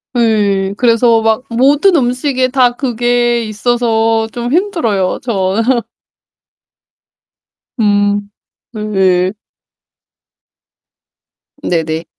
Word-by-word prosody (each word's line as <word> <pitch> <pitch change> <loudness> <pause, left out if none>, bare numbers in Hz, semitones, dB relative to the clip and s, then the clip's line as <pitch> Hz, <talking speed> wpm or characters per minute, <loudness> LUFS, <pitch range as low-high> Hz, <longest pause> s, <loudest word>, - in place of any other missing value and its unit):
네 205 -4 +1
그래서 230 -1 +3
막 225 +3 +1
모든 285 +10 +3
음식에 255 -1 0 0.3
그게 240 -1 0
있어서 225 0 0
좀 240 +2 -4
힘들어요 315 - 0
저는. 225 +2 0 2.0
음. 205 -1 +1 0.4
네. 190 -4 0 2.3
네네. 160 - -2
225 Hz, 130 characters per minute, -14 LUFS, 205-245 Hz, 2.3 s, 그래서